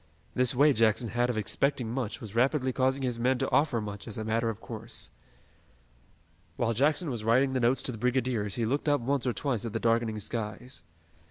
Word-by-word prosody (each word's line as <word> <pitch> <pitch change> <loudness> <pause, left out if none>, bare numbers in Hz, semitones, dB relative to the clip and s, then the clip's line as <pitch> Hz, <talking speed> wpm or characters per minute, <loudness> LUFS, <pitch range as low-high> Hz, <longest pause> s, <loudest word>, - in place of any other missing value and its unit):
This 125 0 +3
way 145 +3 +5
Jackson 115 0 +2
had 120 +3 0
of 120 - -1
expecting 120 +2 0
much 120 -4 -3
was 105 -3 -9
rapidly 130 +2 +1
causing 130 +1 +1
his 125 -2 -2
men 130 +2 +2
to 135 +1 -2
offer 145 -5 +2
much 105 0 -7
as 110 - -6
a 110 - -3
matter 115 +1 0
of 110 -1 -5
course. 115 -1 -7 1.4
While 115 +3 0
Jackson 145 - +1
was 115 -3 -4
writing 130 +4 +3
the 130 - +1
notes 125 +1 +2
to - - -1
the 115 - -8
brigadiers 125 -5 0
he 115 - -1
looked 140 +6 0
up 145 - +3
once 135 +1 -1
or 125 - +1
twice 125 -6 -2
at 115 -2 -5
the 115 - -1
darkening 115 -1 +1
skies. 110 +1 -4
120 Hz, 205 wpm, -29 LUFS, 110-130 Hz, 1.4 s, way